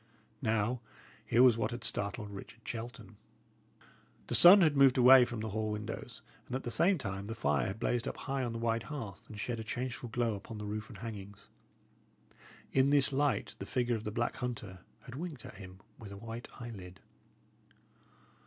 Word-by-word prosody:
Now, 115 Hz, +1 st, 0 dB, 0.5 s
here 120 Hz, +3 st, +5 dB
was 125 Hz, -3 st, +6 dB
what 110 Hz, -1 st, 0 dB
had 120 Hz, -1 st, -6 dB
startled 105 Hz, 0 st, -2 dB
Richard 110 Hz, +3 st, -11 dB
Shelton. 120 Hz, +1 st, -7 dB, 1.1 s
The -, -, -4 dB
sun 190 Hz, +3 st, +10 dB
had 155 Hz, -4 st, +4 dB
moved 135 Hz, -2 st, +6 dB
away 125 Hz, 0 st, +8 dB
from 120 Hz, -2 st, -5 dB
the 110 Hz, -, -3 dB
hall 110 Hz, +1 st, -2 dB
windows, 105 Hz, 0 st, -6 dB, 0.2 s
and 125 Hz, -, -4 dB
at 130 Hz, -, -3 dB
the 120 Hz, -, -4 dB
same 185 Hz, -, +3 dB
time 100 Hz, -6 st, -5 dB
the 115 Hz, -, -5 dB
fire 70 Hz, -, +1 dB
had 100 Hz, -, -5 dB
blazed 120 Hz, +1 st, 0 dB
up -, -, -4 dB
high 135 Hz, -1 st, -2 dB
on 120 Hz, -, -2 dB
the 115 Hz, -, -4 dB
wide 115 Hz, 0 st, 0 dB
hearth, 115 Hz, -11 st, -7 dB
and 105 Hz, -, -9 dB
shed 115 Hz, +1 st, -3 dB
a -, -, -4 dB
changeful 120 Hz, 0 st, -4 dB
glow 115 Hz, 0 st, 0 dB
upon 105 Hz, +3 st, -8 dB
the 105 Hz, -, -6 dB
roof 105 Hz, +1 st, -5 dB
and -, -, -10 dB
hangings. 100 Hz, -3 st, -8 dB, 1.2 s
In 135 Hz, +1 st, +4 dB
this 140 Hz, -1 st, +4 dB
light 145 Hz, +1 st, 0 dB
the -, -, -6 dB
figure 120 Hz, -1 st, 0 dB
of 110 Hz, -, -5 dB
the 105 Hz, -, -3 dB
black 120 Hz, +2 st, -2 dB
hunter 110 Hz, -7 st, -5 dB, 0.2 s
had 125 Hz, -, -11 dB
winked 150 Hz, -3 st, -6 dB
at -, -, -10 dB
him 95 Hz, -1 st, -11 dB, 0.2 s
with 105 Hz, -3 st, -10 dB
a 100 Hz, -, -8 dB
white 115 Hz, +3 st, -7 dB
eyelid. 100 Hz, -6 st, -9 dB
115 Hz, 190 wpm, -32 LUFS, 105-125 Hz, 1.2 s, sun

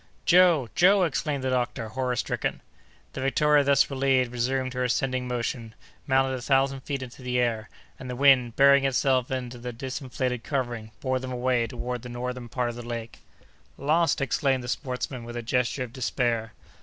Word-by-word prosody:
"Joe! 175 Hz, -7 st, +5 dB
Joe!" 190 Hz, +2 st, +5 dB
exclaimed 145 Hz, -3 st, -1 dB
the 130 Hz, -, 0 dB
doctor, 120 Hz, -2 st, -1 dB
horror 125 Hz, +1 st, -2 dB
stricken. -, -, -2 dB, 0.5 s
The 135 Hz, -, -5 dB
Victoria 145 Hz, +2 st, +3 dB
thus 140 Hz, -1 st, +4 dB
relieved 130 Hz, -2 st, +1 dB
resumed 130 Hz, +2 st, -1 dB
her 125 Hz, 0 st, -1 dB
ascending 130 Hz, 0 st, -1 dB
motion, 115 Hz, -2 st, -3 dB, 0.3 s
mounted 135 Hz, -1 st, +2 dB
a 130 Hz, -, -4 dB
thousand 135 Hz, +1 st, +2 dB
feet 135 Hz, 0 st, -4 dB
into 125 Hz, +1 st, -11 dB
the 125 Hz, 0 st, -2 dB
air, 115 Hz, -3 st, 0 dB, 0.3 s
and 130 Hz, -, -8 dB
the 125 Hz, -, -4 dB
wind, 130 Hz, -3 st, +4 dB
burying 140 Hz, 0 st, +6 dB
itself 130 Hz, -1 st, +2 dB
in 130 Hz, -2 st, -3 dB
the 125 Hz, 0 st, -7 dB
disinflated 130 Hz, 0 st, -4 dB
covering, 120 Hz, -6 st, -3 dB
bore 130 Hz, -1 st, 0 dB
them 130 Hz, 0 st, -6 dB
away 125 Hz, -1 st, +1 dB
toward 125 Hz, +1 st, -5 dB
the 125 Hz, -, -9 dB
northern 125 Hz, 0 st, -5 dB
part 120 Hz, 0 st, -1 dB
of 120 Hz, -, -6 dB
the 120 Hz, -, -7 dB
lake. 115 Hz, -1 st, -6 dB, 0.6 s
"Lost!" 160 Hz, +1 st, +2 dB
exclaimed 135 Hz, 0 st, +1 dB
the -, -, -7 dB
sportsman, 125 Hz, -1 st, -4 dB
with 120 Hz, +1 st, -7 dB
a 120 Hz, -, -4 dB
gesture 125 Hz, +2 st, 0 dB
of 120 Hz, -2 st, -9 dB
despair. 120 Hz, -3 st, -1 dB
130 Hz, 180 wpm, -26 LUFS, 120-135 Hz, 0.6 s, burying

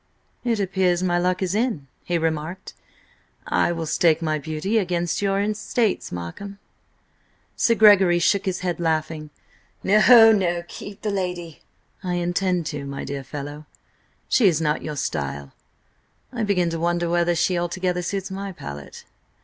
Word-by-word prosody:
"It 235 Hz, -3 st, 0 dB
appears 185 Hz, -2 st, +1 dB
my 175 Hz, -1 st, +1 dB
luck 180 Hz, +2 st, 0 dB
is 185 Hz, -1 st, -1 dB
in," 215 Hz, -, -1 dB, 0.2 s
he 175 Hz, -, -1 dB
remarked. 160 Hz, +3 st, -3 dB, 0.7 s
"I -, -, +1 dB
will 165 Hz, -1 st, -3 dB
stake 160 Hz, 0 st, +3 dB
my 155 Hz, -2 st, -1 dB
beauty 160 Hz, +9 st, -1 dB
against 175 Hz, -3 st, -1 dB
your 195 Hz, -1 st, +1 dB
estates, 215 Hz, +1 st, -1 dB
Markham." 90 Hz, -, -7 dB, 1.0 s
Sir 230 Hz, -, +3 dB
Gregory 200 Hz, -5 st, +6 dB
shook 195 Hz, +3 st, +2 dB
his 185 Hz, -1 st, -1 dB
head, 175 Hz, -2 st, -2 dB
laughing. 155 Hz, -2 st, -1 dB, 0.5 s
"No, 225 Hz, +3 st, +7 dB
no! 175 Hz, -5 st, +1 dB
Keep 200 Hz, +3 st, -10 dB
the 210 Hz, -, -1 dB
lady!" 180 Hz, -4 st, -4 dB, 0.4 s
"I 180 Hz, -1 st, -1 dB
intend 175 Hz, 0 st, 0 dB
to, 145 Hz, -1 st, -5 dB
my 140 Hz, 0 st, -6 dB
dear 140 Hz, -1 st, -5 dB
fellow. 145 Hz, +3 st, -7 dB, 0.6 s
She 235 Hz, -6 st, +4 dB
is 165 Hz, -5 st, +3 dB
not 150 Hz, -1 st, 0 dB
your 150 Hz, -, -5 dB
style. 70 Hz, -, -4 dB, 0.8 s
I 240 Hz, -, -3 dB
begin 185 Hz, -5 st, +1 dB
to 165 Hz, -, -3 dB
wonder 175 Hz, +1 st, 0 dB
whether 175 Hz, 0 st, +1 dB
she 175 Hz, +2 st, +1 dB
altogether 180 Hz, +1 st, -1 dB
suits 190 Hz, +2 st, -4 dB
my 195 Hz, +1 st, -5 dB
palate." 70 Hz, -, -9 dB
175 Hz, 150 wpm, -23 LUFS, 160-195 Hz, 1.0 s, No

